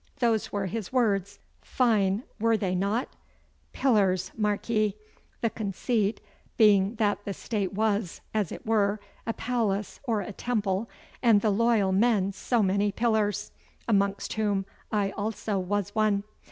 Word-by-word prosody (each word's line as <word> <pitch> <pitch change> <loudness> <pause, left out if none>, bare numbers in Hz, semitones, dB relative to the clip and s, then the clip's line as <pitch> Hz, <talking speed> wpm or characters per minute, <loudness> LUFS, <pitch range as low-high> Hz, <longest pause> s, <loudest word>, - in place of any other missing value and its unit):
Those 230 -4 +1
were 200 -1 -1
his 210 0 -4
words. 205 -6 +1 0.2
Fine, 215 -4 +1 0.2
were 225 +1 +3
they 190 -4 -1
not? 200 +6 0 0.6
Pillars, 190 -7 +2
mark 210 -2 -1
ye, 215 -3 +1 0.5
the 230 - +1
conceit 210 +1 -1 0.4
being 205 -1 +5
that 205 -2 0
the 200 -1 -4
State 200 -5 -2
was, 205 -3 0
as 210 -6 0
it - - -8
were, 210 -2 +2 0.3
a 230 - 0
palace 220 -5 -1
or 225 -5 0
a 200 +2 -6
temple, 210 -2 -1 0.3
and 225 -5 +5
the 215 - +2
loyal 220 -2 +3
men 200 -1 +3
so 230 +3 +1
many 200 +2 +2
pillars, 210 -2 0 0.4
amongst 200 -2 +1
whom 205 -3 0 0.3
I 205 -2 +1
also 210 -1 -2
was 205 +2 -2
one. 215 -2 +2
210 Hz, 140 wpm, -27 LUFS, 200-225 Hz, 0.6 s, being